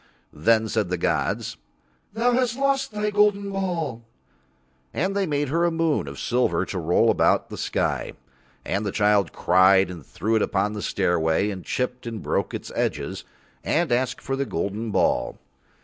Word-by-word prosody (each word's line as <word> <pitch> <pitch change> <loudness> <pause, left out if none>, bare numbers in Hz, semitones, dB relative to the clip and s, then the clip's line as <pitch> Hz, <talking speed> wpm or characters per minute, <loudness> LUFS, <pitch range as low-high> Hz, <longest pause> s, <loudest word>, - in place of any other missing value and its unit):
Then 110 +8 +2
said 110 -4 -1
the 90 - -1
gods: - - -1 0.6
"Thou 235 +3 +2
hast 245 -1 +1
lost 275 -2 +1
thy 210 0 -1
golden 205 -1 +2
ball," 170 -11 -2 0.9
and 190 +6 0
They 200 -2 +1
made 145 -2 -1
her 165 +4 +1
a 175 - +4
moon 165 -2 0
of - - -7
silver 125 +1 +1
to 95 - -4
roll 85 +1 +3
about - - +2
the - - -5
sky. - - -1 0.5
And 100 +2 -1
the 100 - -2
child 105 -3 +2
cried 95 +1 +4
and 85 -4 -9
threw 110 - -2
it 110 - +3
upon 105 +2 0
the 105 - -5
stairway 90 +1 +1
and 95 -3 -7
chipped 125 -1 -3
and 115 -2 -4
broke - - -1
its - - -7
edges - - -2 0.4
and 165 -3 +1
asked 130 +1 0
for 135 - -2
the 135 - -1
golden 105 +6 -3
ball. - - +1
120 Hz, 170 wpm, -24 LUFS, -, 0.9 s, a